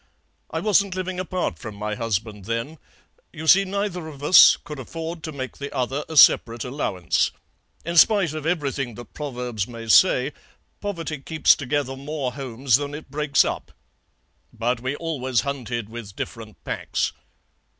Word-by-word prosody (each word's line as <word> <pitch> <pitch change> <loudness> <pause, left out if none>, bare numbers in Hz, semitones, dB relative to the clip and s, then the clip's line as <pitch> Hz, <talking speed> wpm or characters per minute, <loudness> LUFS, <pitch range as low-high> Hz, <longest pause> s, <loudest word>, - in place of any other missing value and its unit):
I - - -3
wasn't 200 -3 +2
living 185 0 -3
apart 180 - -2
from 105 +5 -8
my 105 +1 -3
husband 105 -2 -3
then; 115 +8 -3 0.5
you 160 -1 -8
see, 195 +4 +6
neither 195 -3 -3
of 145 -2 -10
us 180 - +8
could 150 -3 -9
afford 165 +5 -6
to 155 - -5
make 130 -3 -6
the 140 0 -5
other 135 +2 -2
a 160 - -4
separate 115 -4 +6
allowance. 95 -9 0 0.6
In 170 +1 -3
spite 190 -2 +5
of 155 -1 -5
everything 140 -7 -2
that 120 - -11
proverbs 125 -8 -4
may 115 -2 -9
say, 140 - +5 0.5
poverty 165 -7 -4
keeps 160 +3 +3
together 140 -1 -2
more 140 -1 -4
homes 130 -2 +1
than 145 0 -5
it 150 -3 -10
breaks 150 0 +3
up. - - -4 0.8
But 120 +1 -1
we 130 +3 -3
always 130 -7 -1
hunted 120 -5 -4
with 110 -3 -9
different 110 -2 -7
packs. - - -2
140 Hz, 155 wpm, -23 LUFS, 120-160 Hz, 0.8 s, us